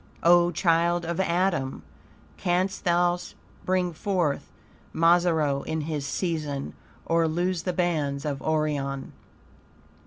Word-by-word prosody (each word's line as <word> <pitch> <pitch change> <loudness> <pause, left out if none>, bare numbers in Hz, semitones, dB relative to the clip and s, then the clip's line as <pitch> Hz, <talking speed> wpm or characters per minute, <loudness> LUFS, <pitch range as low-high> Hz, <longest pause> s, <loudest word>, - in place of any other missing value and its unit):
O 175 0 +6
child 170 0 +2
of 170 +1 -3
Adam! 175 -6 0 0.5
"Canst 185 +1 -1
thou 175 0 +3 0.5
bring 180 -2 +1
forth 170 -4 -1 0.5
Mazzaroth 165 -4 +3
in 160 0 -1
his 150 -2 -3
season? 150 -4 -3 0.3
or 165 0 +2
loose 175 +2 -1
the 180 - -2
bands 155 -6 -1
of 140 -2 -3
Orion?" 145 -3 -1
170 Hz, 105 wpm, -26 LUFS, 150-175 Hz, 0.5 s, O